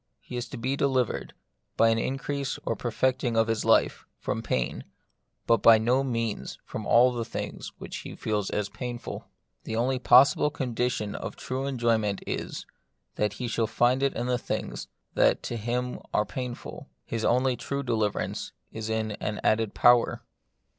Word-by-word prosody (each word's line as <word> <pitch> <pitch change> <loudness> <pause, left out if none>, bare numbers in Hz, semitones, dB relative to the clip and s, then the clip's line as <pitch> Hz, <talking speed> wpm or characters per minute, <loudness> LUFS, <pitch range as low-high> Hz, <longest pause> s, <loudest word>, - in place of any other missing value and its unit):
He - - -9
is 120 - -3
to - - -7
be 130 +4 -1
delivered, 130 -4 0 0.4
by 115 - +5
an 115 0 +2
increase 135 +2 -2
or - - 0
per 120 - -3
fecting 125 -1 +1
of 115 - +5
his 115 -1 0
life, - - +3
from - - -3
pain, 65 -1 -1 0.6
but 115 -3 +3
by 115 -1 +8
no 125 +5 +2
means 115 -5 -2
from 110 - -6
all 125 +2 +6
the 120 -1 -2
things - - -5 0.2
he - - -7
feels 105 -2 -1
as 105 -1 -1
painful. 120 +3 -6 0.4
The 110 - -4
only 125 +3 +1
possible 135 +3 +6
condition 125 -6 -2
of - - -5
a - - -21
true 130 +1 -3
enjoyment 115 -6 +1
is, - - -4 0.5
that 105 -1 0
he 120 +3 -4
shall 115 -1 0
find 120 +4 +2
it 140 0 +1
in 120 - -2
things - - -4 0.3
that - - +3
to - - -3
him 120 +3 -2 0.2
are 105 - +3
painful; 125 0 -6 0.2
his 115 -1 -3
only 125 +1 +3
true 140 +3 -3
deliverance 110 -5 -1 0.2
is 110 0 -5
in 110 -1 -1
an 105 -1 -2
added 110 -1 +2
power. 120 -1 +4
120 Hz, 165 wpm, -27 LUFS, 110-130 Hz, 0.6 s, by